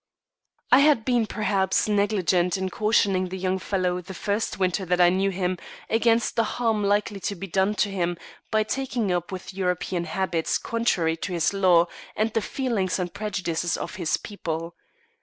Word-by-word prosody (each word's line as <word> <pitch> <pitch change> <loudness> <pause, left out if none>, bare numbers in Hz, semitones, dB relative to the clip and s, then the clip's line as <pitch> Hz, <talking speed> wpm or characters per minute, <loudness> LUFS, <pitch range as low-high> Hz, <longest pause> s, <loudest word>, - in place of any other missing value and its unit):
I 255 - +8
had 280 -6 +4
been, 240 -4 +2
perhaps, 195 -3 +1
negligent 195 -3 +2
in 190 0 -2
cautioning 195 -3 +2
the 190 - -5
young 185 0 -1
fellow 180 -2 -1
the 185 +2 -9
first 205 +5 -2
winter 185 +1 0
that 180 0 0
I 175 -1 +7
knew 190 +2 +1
him 185 -1 -2 0.3
against 230 +1 +2
the 230 - +3
harm 225 -2 0
likely 205 0 +1
to 200 +2 -3
be 195 - -6
done 195 +3 +1
him 180 -5 0 0.3
by 215 -1 +2
taking 245 -3 -2
up 175 +2 -1
with 185 0 -7
European 180 -1 -1
habits 185 -5 -1
contrary 180 -9 0
to 180 +3 -4
his 170 +3 +1
law 180 -4 +5 0.3
and 220 +1 0
the 225 - +1
feelings 220 -8 -1
and 180 -2 -3
prejudices 175 -5 -2
of - - -5
his 170 -4 0
people. 165 -4 -5
190 Hz, 170 wpm, -25 LUFS, 180-215 Hz, 0.3 s, I